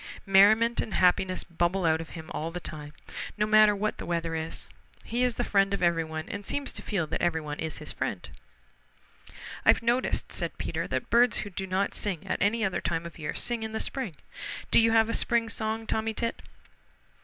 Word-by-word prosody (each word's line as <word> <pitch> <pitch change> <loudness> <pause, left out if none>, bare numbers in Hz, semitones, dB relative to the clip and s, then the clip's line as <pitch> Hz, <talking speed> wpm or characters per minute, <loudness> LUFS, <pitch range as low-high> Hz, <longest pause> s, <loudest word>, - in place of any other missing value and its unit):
Merriment 215 +4 +5
and 220 - -4
happiness 185 0 +3
bubble 175 +2 0
out 160 0 +3
of 165 - -9
him 160 -1 -9
all 160 +2 -3
the 175 +2 -5
time, 150 -3 -7 0.5
no 210 - +2
matter 215 -1 +6
what 215 +2 -2
the - - -5
weather 170 -1 -1
is. 160 0 -4 0.4
He 240 +2 -2
is 250 -2 +2
the 245 - -1
friend 195 -3 +2
of 190 - -4
everyone 160 -2 0
and 205 - -5
seems 280 +7 -2
to - - -5
feel 190 -6 -1
that 155 - -3
everyone 160 -4 -1
is 160 -3 -3
his - - -4
friend. - - -4 1.4
"I've - - +5
noticed," 240 +2 0
said - - -3
Peter, - - -3
"that - - -3
birds 240 0 +5
who 205 - -7
do 190 +1 -4
not 190 +2 0
sing 190 -6 -3
at - - -2
any 215 +3 +2
other 190 - -1
time 165 0 -2
of 170 0 -9
year 150 - -4
sing 240 -2 -1
in 220 0 -5
the 220 - -2
spring. 255 - -3 0.6
Do - - +7
you 225 0 +5
have 225 -1 +5
a 230 - -2
spring 235 -1 +1
song, 220 0 -2
Tommy 220 0 -1
Tit?" 230 0 -2
195 Hz, 205 wpm, -28 LUFS, 165-225 Hz, 1.4 s, Do